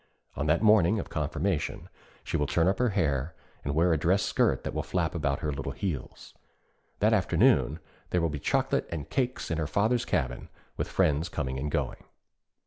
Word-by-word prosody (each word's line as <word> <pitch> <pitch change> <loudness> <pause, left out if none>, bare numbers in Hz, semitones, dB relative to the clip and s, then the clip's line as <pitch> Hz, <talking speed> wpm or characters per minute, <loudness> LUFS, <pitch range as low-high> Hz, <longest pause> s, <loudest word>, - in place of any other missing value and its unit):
On 70 +2 -2
that 80 +7 +2
morning 105 -1 +5
of - - -6
confirmation 75 +3 -2 0.4
she - - -4
will 75 - +1
turn 85 +4 +2
up 95 - +1
her 125 -1 +3
hair, 80 -6 0 0.3
and 70 +1 -2
wear 85 +2 +4
a 80 - +1
dress 95 +6 +2
skirt - - +1
that - - -4
will - - -1
flap 85 -3 -1
about 70 -5 -1
her 75 - -1
little 70 -1 -4
heels. 85 -7 -5
And - - -36 0.6
that - - +4
afternoon 75 - +3 0.3
there 90 - +1
will 85 -1 +1
be 75 -1 -4
chocolate - - 0
and 80 -4 -5
cakes 125 -6 -1
in 80 - -1
her 80 - -1
father's 110 - +1
cabin, 65 -4 -2 0.3
with - - -2
friends 75 +3 +1
coming 65 -3 -3
and 75 +2 -2
going. - - -2
80 Hz, 195 wpm, -28 LUFS, 70-95 Hz, 0.6 s, morning